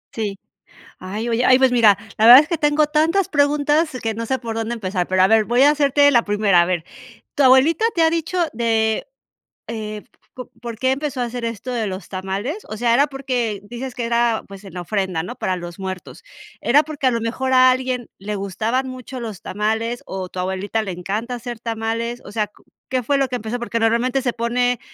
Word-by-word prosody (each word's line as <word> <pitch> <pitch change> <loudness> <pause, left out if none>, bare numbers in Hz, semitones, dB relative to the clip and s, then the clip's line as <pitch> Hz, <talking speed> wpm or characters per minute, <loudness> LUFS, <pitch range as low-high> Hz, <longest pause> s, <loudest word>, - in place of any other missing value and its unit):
Sí. 205 -3 -3 0.6
Ay, 210 +6 -4
oye 235 +2 +1
ay 255 0 +6
pues 265 -1 +4
mira, 225 -5 +5 0.2
la 220 - +3
verdad 245 +4 +11
es 300 - -6
que 335 - 0
tengo 295 0 +2
tantas 325 +5 +1
preguntas 295 +1 +2
que 225 -1 -2
no 230 +1 -4
sé 260 +2 -1
por 230 -2 -5
dónde 225 +1 -2
empezar, 185 -5 -2
pero 185 0 +2
a 190 - +6
ver, 220 +1 +4
voy 240 +3 +2
a 285 - +7
hacerte 285 -1 +4
la 240 -4 +4
primera, 205 -3 +3
a - - +2
ver. 175 -2 -1 0.5
¿Tu 280 - +2
abuelita 265 +11 +5
te 335 - +1
ha 325 - +5
dicho 335 +2 -2
de, 225 -1 0 0.6
eh, 215 -2 -5 0.3
po 250 -1 -9
por 235 -1 -6
qué 260 +3 +1
empezó 280 -1 -4
a - - +1
hacer 240 0 -6
esto 230 +2 -4
de 225 -3 -1
los 185 -1 -6
tamales? 195 - -4
O 215 - -5
sea, 235 +1 +2
era 280 +4 +4
porque 250 -7 -2
dices 245 +2 -6
que 245 -3 -3
era, 235 -1 +1
pues, 195 0 -11
en 195 - -11
la 180 - -5
ofrenda, 185 -3 -2
¿no?, 215 +8 -7
para 190 -6 -2
los 175 +1 -8
muertos. 190 -1 -7 0.4
¿Era 285 +5 +4
porque 290 -4 -2
a - - +4
lo 230 -1 -1
mejor 255 +3 -2
a 255 0 +7
alguien 255 -1 -2
le 210 +2 -5
gustaban 215 +7 -2
mucho 255 0 -8
los 220 -5 -7
tamales 220 +4 -2
o 190 -1 -5
tu 185 - -7
abuelita 190 +4 -2
le 195 - -4
encanta 205 +7 -4
hacer 240 -1 -7
tamales? 230 +1 -3
O 200 - -9
sea, 215 -1 0
¿co 210 - -25 0.3
qué 255 -1 0
fue 280 +5 +1
lo 270 -1 0
que 250 - -2
empezó? 225 +2 -4
Porque 230 -1 -2
normalmente 235 +4 +1
se 250 -2 -1
pone, 245 +1 0
235 Hz, 220 wpm, -20 LUFS, 210-260 Hz, 0.6 s, verdad